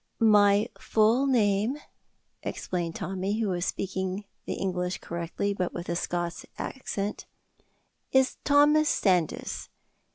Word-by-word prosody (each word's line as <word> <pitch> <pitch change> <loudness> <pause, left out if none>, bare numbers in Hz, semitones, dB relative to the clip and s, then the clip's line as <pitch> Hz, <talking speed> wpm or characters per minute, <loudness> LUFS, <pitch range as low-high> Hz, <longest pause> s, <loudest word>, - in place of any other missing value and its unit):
"My 205 -2 +5
full 225 +5 +3
name," 220 0 +2 0.6
explained 170 -2 -3
Tommy, 195 +3 -2
who 220 -3 0
was 175 -1 -1
speaking 190 +1 -2 0.2
the - - -2
English 180 -1 -2
correctly, 170 +4 -3
but 185 -2 -2
with 175 0 -5
a 170 - 0
Scots 175 0 -2
accent, 210 -5 -4 0.8
"is 265 0 +3
Thomas 295 +1 +5
Sandys. 180 -6 0
195 Hz, 110 wpm, -28 LUFS, 180-225 Hz, 0.8 s, My